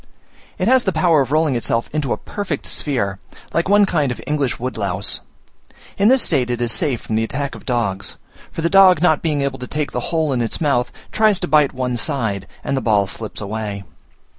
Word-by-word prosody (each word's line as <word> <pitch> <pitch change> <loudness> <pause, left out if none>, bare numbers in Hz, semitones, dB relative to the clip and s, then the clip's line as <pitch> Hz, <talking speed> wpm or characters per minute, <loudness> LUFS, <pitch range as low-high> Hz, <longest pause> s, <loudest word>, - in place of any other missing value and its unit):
It - - -1
has 260 -1 +5
the 190 - +1
power 160 -2 +3
of 135 0 -2
rolling 155 -2 +2
itself 115 0 -1
into 150 -5 -1
a - - 0
perfect 195 -9 -5
sphere, 100 -9 -1 0.3
like 170 +3 0
one 205 0 +6
kind 150 -8 0
of 120 - -5
English 145 -4 -1
woodlouse. 105 -6 -1 0.8
In 200 - +3
this 260 +2 +5
state 130 -6 +1
it 120 -1 -2
is 120 -1 +1
safe 120 +2 +1
from - - -6
the 115 - +1
attack 140 +4 -3
of - - -12
dogs; 110 -6 -2 0.3
for 165 - -5
the - - +3
dog 190 -2 +6
not 160 -4 +3
being 150 -4 0
able 135 -1 -3
to 125 - -6
take 150 +1 -3
the - - -2
whole 160 -4 0
in 125 - 0
its 115 - -2
mouth, 140 -6 +1 0.2
tries 215 -3 +3
to - - -1
bite 150 -1 +4
one 125 -1 -2
side, 115 - -1 0.2
and - - -1
the 135 - -1
ball 105 -4 +2
slips 110 +3 -7
away. 105 -1 -4
135 Hz, 215 wpm, -19 LUFS, 115-160 Hz, 0.8 s, one